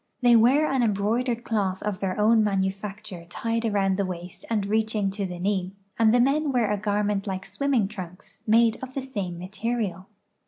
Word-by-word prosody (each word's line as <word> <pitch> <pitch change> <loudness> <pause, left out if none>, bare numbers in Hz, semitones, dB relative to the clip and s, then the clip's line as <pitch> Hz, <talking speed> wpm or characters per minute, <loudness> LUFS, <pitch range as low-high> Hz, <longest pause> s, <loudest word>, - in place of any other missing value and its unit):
They 245 -1 +6
wear 255 +7 +5
an 270 -3 +1
embroidered 230 +3 0
cloth 195 -5 -1
of 210 -3 -2
their 190 0 -2
own 220 +1 +5
manufacture 195 -2 -3
tied 230 +5 -2
around 195 -3 +1
the 200 - +1
waist 175 -1 -8
and 215 -3 0
reaching 215 -1 0
to 200 0 -3
the 180 -1 -6
knee, 190 0 -1 0.3
and 225 -1 +5
the 245 - +4
men 280 +4 +2
wear 240 -5 +1
a - - +2
garment 205 0 -1
like 190 -1 -3
swimming 230 +2 0
trunks, 185 -3 -10
made 225 +1 +4
of 260 0 -8
the 270 - -2
same 200 -10 -4
material. 200 +1 -3
210 Hz, 185 wpm, -25 LUFS, 190-230 Hz, 0.3 s, They